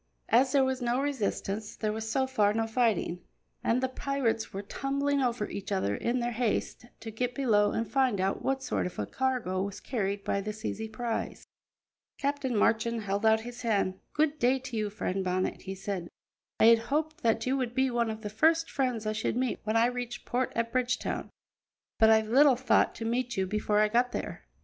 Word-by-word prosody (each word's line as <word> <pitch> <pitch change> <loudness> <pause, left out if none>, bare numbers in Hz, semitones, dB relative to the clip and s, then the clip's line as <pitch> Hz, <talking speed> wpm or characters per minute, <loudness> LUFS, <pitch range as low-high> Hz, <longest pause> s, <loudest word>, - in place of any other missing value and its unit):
As 255 +3 +4
there 275 -2 +5
was 260 -1 -1
no 240 +1 +1
resistance, 220 -6 -2
there 215 -1 -2
was 220 0 -4
so 265 +3 +2
far 210 -5 +2
no 225 0 +1
fighting, 220 -6 0 0.4
and 245 +3 +1
the - - +3
pirates 260 -4 -1
were 195 +1 -5
tumbling 280 +5 -1
over 240 -4 0
each 200 0 -6
other 100 - 0
in 240 - -1
their 240 0 -1
haste 240 +1 -2
to 225 - -6
get 245 +3 -2
below 210 -7 +3
and 230 0 -1
find 260 -7 +1
out 190 +1 0
what 270 0 -1
sort - - -1
of 180 - -10
a 105 - -1
cargo 245 - -1
was 200 0 -4
carried 200 -5 -2
by 200 - 0
this 215 +2 -6
easy 220 0 -3
prize. 230 +1 -4 0.7
Captain 280 -4 -1
Marchand 230 +1 +2
held 200 +2 0
out 220 0 +4
his 240 +1 -8
hand. 200 -5 0
"Good 300 0 +1
day 250 +2 +3
to 260 -2 -7
you, 215 -1 -1
friend 195 -2 -2
Bonnet," 185 0 -1
he 190 0 -6
said. 190 -3 -4 0.5
"I - - +6
had 230 0 +7
hoped 310 +2 -1
that 225 -1 +1
you 260 +1 +1
would 245 -2 -2
be 265 0 +2
one 235 -1 +1
of 220 0 -5
the 210 - -4
first 325 +8 +2
friends 250 -5 -1
I 215 - 0
should 220 +2 -1
meet 255 -2 -1
when 215 +1 +1
I 230 - +5
reached 245 -1 -4
port 250 +1 -1
at 230 0 -1
Bridgetown, 255 0 -1 0.7
but 220 - +7
I 220 0 +6
little 260 +5 +5
thought 260 +2 +2
to 225 - -5
meet 240 0 -1
you 190 - +1
before 210 +1 0
I 215 - +5
got 240 +3 +1
there." - - -5
230 Hz, 205 wpm, -29 LUFS, 210-255 Hz, 0.7 s, had